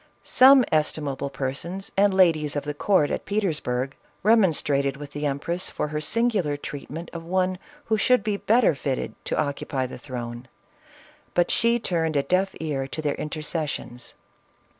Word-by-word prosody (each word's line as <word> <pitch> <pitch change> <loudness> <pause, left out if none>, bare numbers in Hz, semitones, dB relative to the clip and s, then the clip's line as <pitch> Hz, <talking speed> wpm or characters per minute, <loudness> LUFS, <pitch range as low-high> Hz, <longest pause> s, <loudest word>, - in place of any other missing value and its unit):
Some 260 0 +7
estimable 150 -3 0
persons, 145 +9 -4
and 200 +1 +4
ladies 165 -6 +3
of 145 - -1
the 150 0 -3
court 150 0 +2
at - - -2
Petersburg, 150 -10 -1 0.3
remonstrated 150 - +3
with 145 0 -9
the 145 0 -2
empress 170 +6 -2
for 150 - -3
her 150 0 -3
singular 195 -5 +1
treatment 145 +3 -7
of 170 -1 -6
one 185 +1 0 0.3
who 220 -1 +1
should 250 -2 +3
be 210 -1 0
better 225 -1 +3
fitted 135 -2 -3
to - - -1
occupy 140 -3 -1
the 125 - -8
throne, 120 -2 -7 0.9
but 175 0 +3
she 235 0 +3
turned 165 -7 -1
a 140 - +2
deaf 185 +6 +1
ear 140 -4 -2
to 155 - -5
their 145 -1 +1
intercessions. 150 -5 -4
155 Hz, 155 wpm, -25 LUFS, 140-190 Hz, 0.9 s, Some